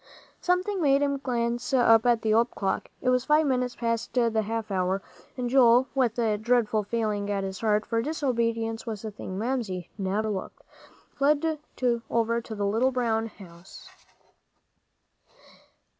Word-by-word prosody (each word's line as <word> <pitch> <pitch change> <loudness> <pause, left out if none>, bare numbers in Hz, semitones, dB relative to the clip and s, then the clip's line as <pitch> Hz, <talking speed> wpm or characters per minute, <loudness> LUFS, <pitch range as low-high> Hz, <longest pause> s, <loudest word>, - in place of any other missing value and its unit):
Something 365 +2 0
made 280 -2 +3
him 280 -1 0
glance 240 -2 -2
up 230 -2 +5
at 235 -2 +3
the 215 -1 +2
old 230 +2 +3
clock. 195 -4 -3
It 255 - +1
was 250 -1 +2
five 305 +1 +4
minutes 250 -3 0
past 230 -1 -2
the 230 -3 +2
half 220 0 -4
hour, 185 0 0 0.4
and 250 -1 -2
Joel, 245 0 +5
with 250 -4 +1
a 220 -3 +1
dreadful 225 -1 +2
feeling 210 -2 -2
at 200 -1 -1
his 190 -1 -5
heart, 215 -1 +1
for 230 -1 0
disobedience 230 -5 -1
was 220 -1 -5
a 215 - -4
thing 190 -2 -7
Mamsie 215 -6 -3
never 200 +3 -1
overlooked, 195 -3 -5 0.5
fled 300 +2 +1 0.5
over 230 0 +1
to 225 -1 -8
the 205 -1 -2
little 225 +6 +2
brown 225 -3 0
house. 180 -4 -14
230 Hz, 155 wpm, -27 LUFS, 215-250 Hz, 0.5 s, up